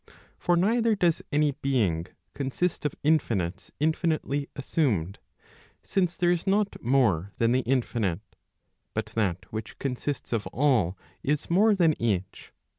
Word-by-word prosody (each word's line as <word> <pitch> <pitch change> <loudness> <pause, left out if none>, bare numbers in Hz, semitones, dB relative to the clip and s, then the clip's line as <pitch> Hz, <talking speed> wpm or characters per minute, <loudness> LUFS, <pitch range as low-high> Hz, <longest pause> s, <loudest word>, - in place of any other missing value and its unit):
For 175 0 +2
neither 225 +4 +3
does 175 -4 +2
any 150 0 +3
being 115 - 0 0.3
consist 145 +5 -2
of 145 - -7
infinites 110 - 0
infinitely 155 -2 0
assumed; 110 - 0 0.6
since 180 -3 0
there 175 -1 +3
is 175 +2 -1
not 205 +1 +1
more 110 -8 +2
than 115 0 +2
the 125 - +3
infinite; 120 -7 0 0.7
but - - -1
that 95 -5 -1
which 110 0 -6
consists 135 0 -3
of 110 -3 -1
all 115 - +2 0.2
is 150 +3 -1
more 205 +4 +5
than 170 -4 +4
each. 95 -5 -2
135 Hz, 130 wpm, -27 LUFS, 110-165 Hz, 0.7 s, more